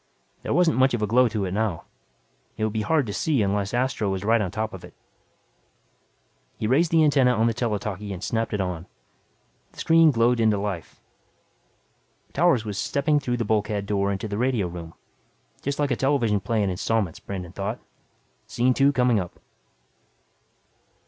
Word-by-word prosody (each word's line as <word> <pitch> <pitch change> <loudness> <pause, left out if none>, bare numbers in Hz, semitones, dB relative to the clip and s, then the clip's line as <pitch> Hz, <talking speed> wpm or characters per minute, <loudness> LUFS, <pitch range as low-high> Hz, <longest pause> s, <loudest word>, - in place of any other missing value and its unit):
There - - -4
wasn't 175 -6 +3
much 130 -1 +4
of 110 - -3
a - - +3
glow 125 +4 +4
to 110 -3 -2
it 90 - -4
now. 100 -4 -1 0.7
It 110 - -2
would 110 -1 -1
be 110 - -1
hard 150 +5 +1
to 105 - -5
see 140 -4 +1
unless 100 0 -1
Astro 120 -4 0
was 95 0 -3
right 115 +2 +3
on 95 - -1
top 110 +3 -3
of 95 - -9
it. - - -13 1.6
He - - -3
raised 145 +9 +3
the 160 -1 +4
antenna 135 -4 +4
on 110 0 +2
the 115 - +2
tele 115 -2 -1
talkie 100 0 -5
and 95 0 -6
snapped 115 -1 -1
it 105 - -2
on. 90 -2 -3 0.9
The - - -22
screen 165 -1 +5
glowed 120 -2 +2
into 110 -2 +3
life. 100 -5 -5 1.3
Towers 140 -8 +3
was 105 -2 -4
stepping 145 +1 +1
through 125 -3 -2
the 115 - -2
bulkhead 105 -1 0
door 100 -1 0
into 100 +2 -3
the 105 0 -4
radio 125 -5 +1
room. 85 -1 -9 0.7
Just 140 0 -3
like 145 -2 0
a - - +2
television 120 -6 +1
play 105 +2 -1
in 95 - 0
installments, 100 -1 -1
Brandon 90 -3 -7
thought. 100 +2 -4 0.7
Scene 125 +2 +1
two 140 +2 +4
coming 125 -4 +2
up. 90 -2 -7
110 Hz, 180 wpm, -24 LUFS, 100-125 Hz, 1.6 s, screen